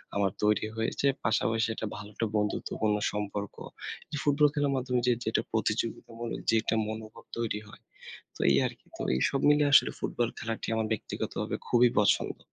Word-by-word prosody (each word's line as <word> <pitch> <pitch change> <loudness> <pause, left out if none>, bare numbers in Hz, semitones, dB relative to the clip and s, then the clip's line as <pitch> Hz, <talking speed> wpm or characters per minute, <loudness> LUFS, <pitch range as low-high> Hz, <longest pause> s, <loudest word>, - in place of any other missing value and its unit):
আমার 100 -2 +2
তৈরি 105 0 +3
হয়েছে। 115 +5 0 0.2
পাশাপাশি 115 +1 +2
এটা 110 - -3
ভালো 100 0 -8
একটা 115 +1 -1
বন্ধুত্বপূর্ণ 105 +1 0 0.2
সম্পর্ক। 105 -1 -4 0.7
ফুটবল 150 0 +4
খেলার 145 -2 +1
মাধ্যমে 125 -1 0
যে 125 - +5
যেটা 110 0 +1
প্রতিযোগিতামূলক 115 +1 -2
যে 115 - +5
একটা 110 - 0
মনোভাব 110 +1 -7
তৈরি 110 -3 -1
হয়। - - -14 0.6
তো - - -14
এই 70 - +5
আরকি, - - -9
তো - - -4
এই 65 - 0
সব 135 - -1
মিলে 150 0 +5
আসলে - - +7
ফুটবল 120 -1 -1
খেলাটি 115 0 -4
আমার 110 -1 0
ব্যক্তিগতভাবে 110 - -3
খুবই 120 0 +5
পছন্দ। 105 - +2
110 Hz, 165 wpm, -29 LUFS, 105-120 Hz, 0.7 s, আসলে